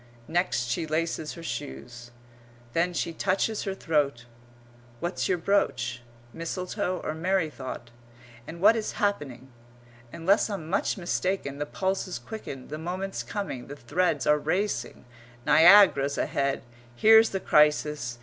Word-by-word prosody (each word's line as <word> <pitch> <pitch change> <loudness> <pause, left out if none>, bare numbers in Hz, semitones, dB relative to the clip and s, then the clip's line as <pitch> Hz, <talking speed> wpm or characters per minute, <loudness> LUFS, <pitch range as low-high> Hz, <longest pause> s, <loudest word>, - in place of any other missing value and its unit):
Next 175 -6 0
she 125 +7 -2
laces 160 0 -2
her 170 - -10
shoes. 120 - -7 0.6
Then 175 +2 +1
she 170 -1 -2
touches 200 +5 -1
her 195 -1 -3
throat. 145 -9 0 0.7
What's 175 +6 -2
your 185 - +2
brooch? 125 -10 0 0.3
Mistletoe 180 +3 -3
or 155 - -2
merry 170 0 0
thought? 130 -4 -8 0.6
And 170 +1 -8
what 215 +3 +7
is 220 -2 -3
happening? 140 - -2 0.6
Unless 195 +7 +2
I'm 195 -7 -5
much 190 +5 0
mistaken, 175 -5 -2
the 145 - -2
pulse's 190 0 -2
quickened, 145 - -8
the 155 +1 -5
moment's 185 +4 -4
coming, 195 - -5
the 145 - -8
threads 145 +1 0
are 150 0 +4
racing, 185 0 -2 0.4
Niagara's 155 -3 +6
ahead. 140 -1 -1 0.3
Here's 220 - +6
the 195 - -2
crisis! 150 -6 +2
165 Hz, 130 wpm, -27 LUFS, 140-190 Hz, 0.7 s, what